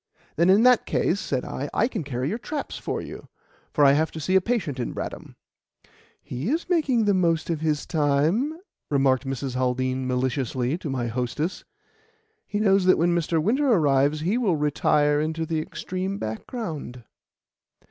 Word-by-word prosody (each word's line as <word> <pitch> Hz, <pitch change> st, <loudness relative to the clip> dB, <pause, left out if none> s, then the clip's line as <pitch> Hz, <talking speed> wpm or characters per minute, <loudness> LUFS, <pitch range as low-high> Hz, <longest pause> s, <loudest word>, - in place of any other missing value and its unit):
"Then, 170 Hz, +3 st, +3 dB
in 200 Hz, +4 st, +6 dB
that 250 Hz, -2 st, +5 dB
case," 190 Hz, -, +1 dB
said 130 Hz, -9 st, -2 dB
I, 140 Hz, +3 st, -4 dB
"I 230 Hz, -, +3 dB
can 220 Hz, -9 st, -4 dB
carry 130 Hz, -2 st, -3 dB
your 220 Hz, +6 st, -3 dB
traps 295 Hz, +4 st, -5 dB
for -, -, -3 dB
you, -, -, -9 dB, 0.4 s
for 145 Hz, -, +4 dB
I 135 Hz, -, +7 dB
have 155 Hz, +3 st, +2 dB
to 160 Hz, -, -6 dB
see 185 Hz, +5 st, 0 dB
a 190 Hz, -, +6 dB
patient 185 Hz, -, -2 dB
in 120 Hz, -, -3 dB
Bradham." -, -, -6 dB, 0.9 s
"He 130 Hz, -, -4 dB
is 320 Hz, +5 st, -1 dB
making 285 Hz, -, +2 dB
the 205 Hz, -, +3 dB
most 170 Hz, -3 st, +1 dB
of 160 Hz, -, -1 dB
his 155 Hz, -2 st, 0 dB
time," 160 Hz, -, +1 dB, 0.3 s
remarked 135 Hz, -2 st, +2 dB
Mrs. 135 Hz, -1 st, -3 dB
Haldean 130 Hz, 0 st, -1 dB
maliciously 130 Hz, +1 st, -1 dB
to 160 Hz, -, -5 dB
my 130 Hz, -3 st, -2 dB
hostess. 125 Hz, -, -3 dB, 0.8 s
"He 205 Hz, -, -2 dB
knows 195 Hz, -3 st, +3 dB
that 185 Hz, -, +5 dB
when 170 Hz, +2 st, +2 dB
Mr. 170 Hz, -1 st, +1 dB
Winter 255 Hz, -, +2 dB
arrives 145 Hz, -, +3 dB
he 195 Hz, +9 st, +1 dB
will 200 Hz, -9 st, +2 dB
retire 150 Hz, 0 st, +2 dB
into 160 Hz, +1 st, -2 dB
the 160 Hz, 0 st, -1 dB
extreme 185 Hz, +4 st, -4 dB
background." 140 Hz, -, -6 dB
155 Hz, 170 wpm, -25 LUFS, 135-195 Hz, 0.9 s, I